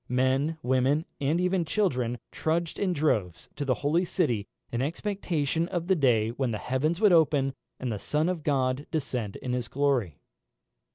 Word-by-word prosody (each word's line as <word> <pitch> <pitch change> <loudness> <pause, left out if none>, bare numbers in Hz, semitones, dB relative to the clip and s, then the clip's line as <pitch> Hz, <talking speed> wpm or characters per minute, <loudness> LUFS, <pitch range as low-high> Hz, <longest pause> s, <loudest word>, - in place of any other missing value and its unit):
Men, 130 +5 +1
women, 130 +5 +2
and 145 +5 +1
even 180 0 +1
children, 125 - 0
trudged 165 +1 -1
in 195 -2 +1
droves 110 - 0
to 145 - -3
the 130 -3 +1
holy 165 +5 +3
city, 135 - 0 0.2
in 120 - -1
expectation 165 -1 -1
of 175 -2 -2
the 190 +1 +3
day 120 -8 +3
when 125 +2 -1
the 110 - -2
heavens 150 - -1
would 210 -4 +5
open, 145 -4 +3 0.3
and 125 -2 -2
the 105 - -3
Son 150 - 0
of 180 -3 -1
God 135 -1 0
descend 125 -9 -2
in 125 - -4
his 125 -2 -2
glory. 130 - 0
140 Hz, 170 wpm, -28 LUFS, 125-165 Hz, 0.3 s, would